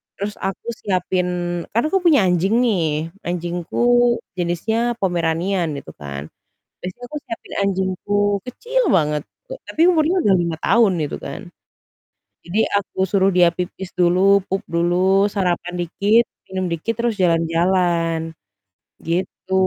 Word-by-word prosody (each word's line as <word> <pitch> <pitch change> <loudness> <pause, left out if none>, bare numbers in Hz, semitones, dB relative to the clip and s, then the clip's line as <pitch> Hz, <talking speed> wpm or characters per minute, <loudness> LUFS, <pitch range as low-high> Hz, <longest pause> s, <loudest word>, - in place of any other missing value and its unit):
terus 205 +1 -4
aku 195 +3 -4
siapin 185 -1 0 0.5
kan 235 - +3
aku 385 - +3
punya 310 - +5
anjing 180 +4 +2
nih, 165 -8 0 0.2
anjingku 175 0 -3 0.6
jenisnya 220 +7 -1
Pomeranian 175 0 0
gitu 140 - -8
kan. 70 -1 -7 0.6
Biasanya 185 +7 -7
aku 300 - -5
siapin 230 - -8
anjingku 190 +1 -2 0.3
kecil 480 - -1
banget, 150 -4 +2 0.3
e - - -5
tapi 315 - -3
umurnya 330 0 +2
udah 205 - +3
5 170 -1 -1
tahun 230 -4 +4
gitu 150 - -3
kan. - - -6 1.0
Jadi 180 +6 -1 0.2
aku 200 -1 -3
suruh 195 0 +3
dia 180 -1 +5
pipis 180 +1 -5
dulu, 185 +2 +4
pup 195 +1 -2
dulu, 180 +3 +2
sarapan 180 -3 -1
dikit, 205 +7 +2 0.3
minum 185 -1 -1
dikit 170 +7 -2
terus 235 -2 0
jalan-jalan, 165 -1 +1 0.7
gitu. 180 +2 -3
185 Hz, 130 wpm, -20 LUFS, 170-200 Hz, 1.0 s, punya